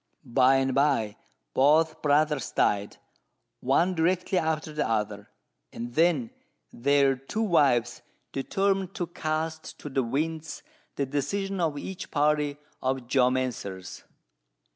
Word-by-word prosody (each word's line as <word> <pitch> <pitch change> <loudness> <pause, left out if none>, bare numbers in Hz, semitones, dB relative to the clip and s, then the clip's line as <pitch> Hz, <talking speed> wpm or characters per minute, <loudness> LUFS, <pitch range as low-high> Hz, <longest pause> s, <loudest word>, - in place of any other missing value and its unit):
By 125 +2 +4
and 135 0 +1
by, 135 -7 +2 0.4
both 155 +4 +3
brothers 150 -2 +2
died, 100 0 +1 0.6
one 165 +8 +2
directly 180 +2 +1
after 160 -1 -2
the 150 -5 -1
other; 105 -2 -2 0.4
and 120 +1 -6
then 175 - +2 0.4
their 140 +2 +3
two 135 +12 -3
wives 125 - +2 0.3
determined 195 +6 -1
to 175 - -2
cast 160 -1 -4
to 150 - -8
the 135 -1 +1
winds 155 +5 -3 0.3
the 140 - 0
decision 185 +9 -2
of 160 -4 0
each 190 +5 -6
party 150 -1 +1 0.2
of 130 -1 -2
geomancers. 125 -7 -1
145 Hz, 120 wpm, -27 LUFS, 130-160 Hz, 0.6 s, By